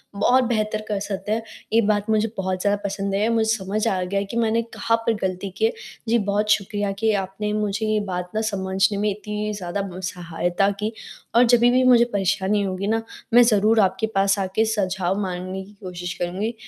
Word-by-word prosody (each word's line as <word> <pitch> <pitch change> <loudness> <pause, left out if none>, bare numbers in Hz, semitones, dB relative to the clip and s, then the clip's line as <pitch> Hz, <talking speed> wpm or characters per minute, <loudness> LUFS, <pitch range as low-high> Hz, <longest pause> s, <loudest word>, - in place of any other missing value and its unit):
बहुत 250 +6 +4
बेहतर 215 -3 -1
कर 205 -2 -1
सकते 200 0 -4
हैं, 225 +1 0 0.3
ये 230 - +5
बात 205 -1 0
मुझे 215 0 +2
बहुत 185 -1 -2
ज़्यादा 205 0 +1
पसंद 200 0 -2
आई 205 +2 +2
और 230 - +1
मुझे 220 -1 +2
समझ 205 +1 -2
आ 185 -1 0
गया 195 +2 -1
कि 235 - -3
मैंने 230 0 +2
कहाँ 230 +1 +1
पर 230 - +3
गलती 190 +1 -2
की 220 - +2
है। 225 - +3 0.4
जी, 235 - +4
बहुत 205 0 0
शुक्रिया 205 0 0
कि 220 -1 +2
आपने 195 +3 -4
मुझे 210 0 -1
ये 215 0 +1
बात 180 0 -4
ना 220 - +1
समझने 195 +1 0
में 210 +1 +1
इतनी 210 +1 -4
ज़्यादा 195 0 -3
म 185 - -7
सहायता 175 +2 -1
की 210 +1 -1 0.4
और 240 - +7
जभी 240 0 +5
भी 255 +1 +3
मुझे 245 -2 +6
परेशानी 195 +1 +1
होगी 195 +1 -2
ना, 225 +1 +1 0.3
मैं 245 +1 +8
ज़रूर 220 -1 +3
आपके 205 +2 +2
पास 195 +1 +3
आके 195 +3 +1
सुझाव 190 -3 -1
माँगने 185 0 -4
की 205 - -17
कोशिश 180 -1 -5
करूँगी। 190 +6 -2
205 Hz, 205 wpm, -23 LUFS, 190-220 Hz, 0.4 s, मैं